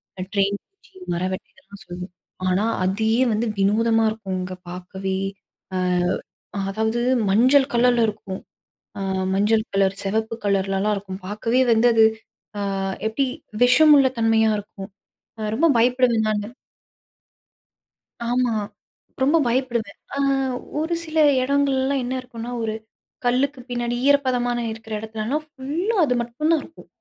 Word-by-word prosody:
இந்த 185 -1 -5
ட்ரெயின் 200 0 +2
பூச்சி, 395 0 -27 0.2
மரவெட்டைகள்லாம் 190 +4 -6
சொல்லுவோம். 180 0 -8 0.3
ஆனா, 185 +3 +2 0.2
அதே 220 +4 +1 0.2
வந்து 215 +2 0
வினோதமா 225 +3 +3
இருக்கும்ங்க 190 -4 -4
பார்க்கவே. 190 +2 -4 1.4
அ - - -2
அதாவது 220 +3 -1 0.3
மஞ்சள் 260 +7 +4
கலர்ல 240 -1 +4
இருக்கும். 210 -3 -5 0.6
அ - - -4 0.3
மஞ்சள் 215 +2 +3
கலர், 195 0 +2
செவப்பு 220 +3 -1
கலர்லலாம் 195 +1 +1
இருக்கும். 195 -1 -7
பார்க்கவே 230 +5 +1
வந்து 230 +1 +5
அது 225 -1 +6 0.8
அ - - -2 0.2
எப்படி 245 +5 0 0.4
விஷமுள்ள 280 +2 +6
தன்மையா 225 -1 +3
இருக்கும். 195 -1 -10 0.5
அ 215 -1 -2
ரொம்ப 330 +6 +3
பயப்படுவேன் 240 -2 +3
நானு. 210 -1 -2 1.8
ஆமா, 245 -1 +1 0.7
ரொம்ப 290 +5 +4
பயப்படுவேன். 235 -4 -1 0.2
ஆ - - -3 0.6
ஒரு 320 +2 -1
சில 320 -1 -2 0.2
இடங்கள்லலாம் 275 0 +1
என்ன 245 +1 -3
இருக்கும்ன்னா, 240 -1 -8
ஒரு 220 - -1 0.5
கல்லுக்கு 260 +3 +1
பின்னாடி 240 0 -2
ஈரப்பதமான 250 -4 +2
இருக்குற 220 0 -8
இடத்துலலாம் 220 +7 -3
ஃபுல்லா 300 +11 -2
அது 250 -3 +1
மட்டும் 240 +7 -1
தான் 320 -3 +3
இருக்கும். 325 - -15
225 Hz, 120 wpm, -22 LUFS, 200-260 Hz, 1.8 s, அது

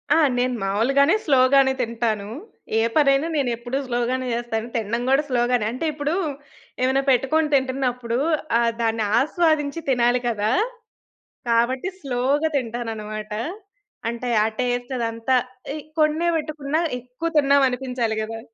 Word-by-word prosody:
ఆ! - - +4 0.2
నేను 250 0 +1
మామూలుగానే 260 - +3
స్లోగానే 265 -1 +4
తింటాను. 225 -3 -1 0.5
ఏ - - +3
పనైనా 280 0 +4
నేను 275 -4 +1
ఎప్పుడూ 240 +3 -3
స్లోగానే 250 +1 -1
చేస్తాను. 235 -1 -2
తినడం 230 +1 -1
కూడా 270 +3 +4
స్లోగానే. 240 -2 +1
అంటే 255 +7 -4
ఇప్పుడు, 295 +2 -2 0.7
ఏమైనా 265 +1 +2
పెట్టుకొని 295 +5 +2
తింటున్నప్పుడు 250 -3 -1 0.4
ఆహ్, 235 -1 +2
దాన్ని 225 -1 +1 0.2
ఆస్వాదించి 310 0 +1
తినాలి 245 -1 +3
కదా! 215 -1 0 1.0
కాబట్టి 245 +8 +1
స్లోగా 275 +4 0
తింటానన్నమాట. 220 -3 -5 0.8
అంటే, 235 +1 -4
ఆ - - +2
టేస్ట్ 245 0 -1
అదంతా 230 +2 0 0.4
ఇ 310 - -5 0.2
కొన్నే 310 +3 +2
వెట్టుకున్నా, 305 0 -2 0.2
ఎక్కువ 250 +7 -5
తిన్నామనిపించాలి 255 -5 +1
గదా! 225 +1 -6
250 Hz, 120 wpm, -23 LUFS, 235-275 Hz, 1.0 s, ఆ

